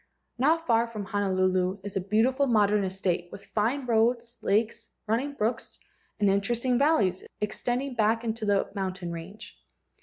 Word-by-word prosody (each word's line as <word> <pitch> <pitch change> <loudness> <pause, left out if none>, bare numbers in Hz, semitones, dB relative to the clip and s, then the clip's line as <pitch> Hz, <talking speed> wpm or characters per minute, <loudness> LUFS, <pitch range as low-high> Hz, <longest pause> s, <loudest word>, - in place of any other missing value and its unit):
Not 325 +5 +2
far 230 -1 +3
from 215 -3 -6
Honolulu 185 -2 +1
is 200 -1 -7
a 195 - 0
beautiful 240 +8 +2
modern 210 -3 +3
estate 185 -2 -2
with - - -10
fine 240 +6 -1
roads, 235 +1 +1
lakes, 215 +3 0 0.2
running 240 +7 -1
brooks, 230 -2 -2 0.4
and 205 - +3
interesting 235 +6 +1
valleys 215 - +2 0.2
extending 245 +5 -2
back 225 0 +1
into 225 0 -3
the 200 -1 +1
mountain 190 -3 -4
range. 170 +6 -9
215 Hz, 145 wpm, -27 LUFS, 195-240 Hz, 0.4 s, far